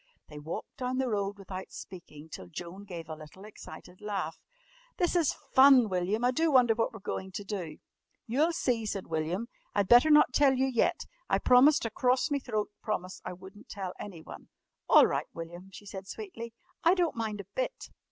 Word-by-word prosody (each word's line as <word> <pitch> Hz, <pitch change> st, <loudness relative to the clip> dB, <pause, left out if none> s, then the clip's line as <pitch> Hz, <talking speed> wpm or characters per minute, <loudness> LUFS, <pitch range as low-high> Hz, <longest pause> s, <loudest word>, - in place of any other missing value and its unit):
They 150 Hz, -1 st, -9 dB
walked 155 Hz, +3 st, -7 dB
down 255 Hz, 0 st, -2 dB
the 260 Hz, -1 st, 0 dB
road 200 Hz, -2 st, -1 dB
without 190 Hz, -1 st, -7 dB
speaking 160 Hz, -5 st, -10 dB
till 115 Hz, -, -9 dB
Joan 175 Hz, -, -8 dB
gave 170 Hz, -5 st, -8 dB
a 160 Hz, -, -5 dB
little 155 Hz, +5 st, -12 dB
excited 185 Hz, -3 st, -12 dB
laugh. 195 Hz, -6 st, -3 dB, 0.6 s
"This 355 Hz, 0 st, +1 dB
is 335 Hz, -5 st, +2 dB, 0.2 s
fun, 260 Hz, -4 st, +7 dB
William! 190 Hz, +6 st, 0 dB
I 250 Hz, -, +4 dB
do 320 Hz, +5 st, +1 dB
wonder 250 Hz, -4 st, +5 dB
what 225 Hz, 0 st, 0 dB
we're 220 Hz, -, -11 dB
going 190 Hz, 0 st, -4 dB
to 205 Hz, -, -5 dB
do." 185 Hz, -6 st, -5 dB, 0.5 s
"You'll 290 Hz, +9 st, +2 dB
see," 240 Hz, -8 st, -1 dB
said 195 Hz, -2 st, -3 dB
William. 165 Hz, +7 st, -2 dB, 0.3 s
"I'd 200 Hz, -2 st, +2 dB
better 245 Hz, +8 st, +7 dB
not 300 Hz, -4 st, +6 dB
tell 280 Hz, -1 st, +5 dB
you 260 Hz, +1 st, +2 dB
yet. 265 Hz, +7 st, +1 dB, 0.3 s
I -, -, +3 dB
promised 255 Hz, +2 st, +5 dB
a 230 Hz, -, -2 dB
crorse 255 Hz, +6 st, +1 dB
me 285 Hz, -, +1 dB
throat 215 Hz, -5 st, -3 dB
promise 185 Hz, -4 st, -4 dB
I -, -, -5 dB
wouldn't 190 Hz, +6 st, -14 dB
tell 190 Hz, -2 st, -5 dB
anyone." 175 Hz, -6 st, -9 dB, 0.4 s
"All -, -, +8 dB
right, -, -, -1 dB
William," 175 Hz, +3 st, -8 dB
she 205 Hz, -, -12 dB
said 195 Hz, -1 st, -8 dB
sweetly. 235 Hz, -, -7 dB, 0.3 s
"I 340 Hz, +3 st, +5 dB
don't 350 Hz, -3 st, +1 dB
mind 220 Hz, -2 st, -3 dB
a 200 Hz, -, -7 dB
bit." -, -, -4 dB
210 Hz, 190 wpm, -30 LUFS, 185-255 Hz, 0.6 s, All